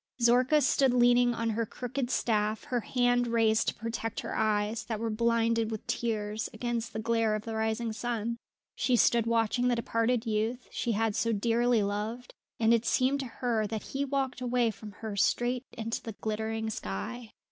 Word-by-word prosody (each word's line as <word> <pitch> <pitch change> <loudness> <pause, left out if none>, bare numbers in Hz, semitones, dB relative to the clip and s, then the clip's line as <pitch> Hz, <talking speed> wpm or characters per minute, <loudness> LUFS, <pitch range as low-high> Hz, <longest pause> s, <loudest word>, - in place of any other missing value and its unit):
Zorka 250 +5 +4
stood 260 -1 +3
leaning 245 0 +4
on 230 0 -1
her 230 +2 0
crooked 245 +3 -4
staff, 215 -3 0
her 255 -5 -1
hand 245 0 +1
raised 225 -2 +2
to - - 0
protect 225 0 -4
her - - -5
eyes, 215 0 0
that 220 -3 -3
were 225 0 -2
blinded 230 0 +1
with 220 -2 -5
tears, 215 -2 -2
against 235 -1 -2
the - - -4
glare 225 -1 +1
of 215 - -4
the 225 - -4
rising 220 +1 -1
sun. 235 0 -2 0.4
She 255 - +1
stood 235 -1 +3
watching 230 +2 +2
the 245 - +3
departing 230 0 0
youth 225 +3 -1
she 235 - -1
had 220 0 0
so 230 - +1
dearly 235 +1 +2
loved, 215 +5 -3 0.3
and 225 0 +4
it 230 -1 +3
seemed 265 +2 +2
to 270 - -3
her 230 -2 -1
that 220 0 -4
he 275 +1 0
walked 270 -2 -2
away 245 -2 +1
from 215 0 -10
her 220 -1 -6
straight 245 +5 +1
into 230 0 -3
the 225 - -6
glittering 220 +1 -3
sky. 150 - -5
230 Hz, 180 wpm, -29 LUFS, 220-245 Hz, 0.4 s, Zorka